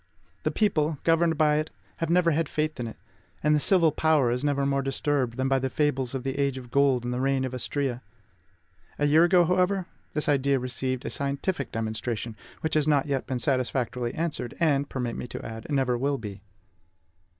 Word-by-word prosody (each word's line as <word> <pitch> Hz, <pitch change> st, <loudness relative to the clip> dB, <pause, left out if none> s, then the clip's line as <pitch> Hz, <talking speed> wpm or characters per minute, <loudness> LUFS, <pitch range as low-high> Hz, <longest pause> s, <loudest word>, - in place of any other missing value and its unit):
The -, -, 0 dB
people, 160 Hz, -8 st, +1 dB
governed 165 Hz, -1 st, +3 dB
by 150 Hz, -1 st, +4 dB
it, 155 Hz, +1 st, -1 dB, 0.4 s
never 170 Hz, 0 st, +4 dB
have -, -, +1 dB
had 160 Hz, -1 st, 0 dB
faith 155 Hz, -2 st, -2 dB
in 120 Hz, -, -2 dB
it; 110 Hz, -, -8 dB, 0.5 s
and 150 Hz, +1 st, +4 dB
the 150 Hz, -, +4 dB
civil 165 Hz, 0 st, +4 dB
power 155 Hz, -5 st, +2 dB
is 125 Hz, +3 st, -1 dB
never 140 Hz, -1 st, +1 dB
more 140 Hz, 0 st, +1 dB
disturbed 135 Hz, -2 st, -1 dB
than 130 Hz, 0 st, 0 dB
by 135 Hz, 0 st, +2 dB
the 130 Hz, 0 st, -1 dB
fables 135 Hz, -3 st, 0 dB
of 130 Hz, -, -3 dB
the 135 Hz, +1 st, -3 dB
age 140 Hz, -2 st, +1 dB
of 125 Hz, -2 st, -9 dB
gold 140 Hz, -3 st, +3 dB
and 120 Hz, 0 st, -2 dB
the 125 Hz, -, -2 dB
reign 135 Hz, 0 st, +1 dB
of 130 Hz, -, -5 dB
Astrea. 130 Hz, 0 st, -2 dB, 1.0 s
A 145 Hz, -, +1 dB
year 155 Hz, +3 st, +5 dB
ago, 175 Hz, -1 st, +5 dB
however, 180 Hz, +2 st, +1 dB, 0.3 s
this 150 Hz, -, 0 dB
idea 140 Hz, -1 st, +3 dB
received 130 Hz, 0 st, -3 dB
a -, -, -3 dB
scientific 140 Hz, +1 st, -2 dB
demonstration, 110 Hz, 0 st, -3 dB, 0.3 s
which 160 Hz, -, -2 dB
has 155 Hz, -1 st, +2 dB
not 145 Hz, -3 st, +3 dB
yet 140 Hz, -3 st, -2 dB
been 130 Hz, -, -1 dB
satisfactorily 125 Hz, -2 st, -1 dB
answered, 160 Hz, -7 st, -3 dB
and, 145 Hz, -4 st, +2 dB
permit 125 Hz, -3 st, -3 dB
me -, -, -5 dB
to -, -, -7 dB
add, 110 Hz, 0 st, -7 dB
never 135 Hz, -4 st, +1 dB
will 140 Hz, +2 st, 0 dB
be. 100 Hz, -4 st, -8 dB
140 Hz, 200 wpm, -27 LUFS, 125-155 Hz, 1.0 s, year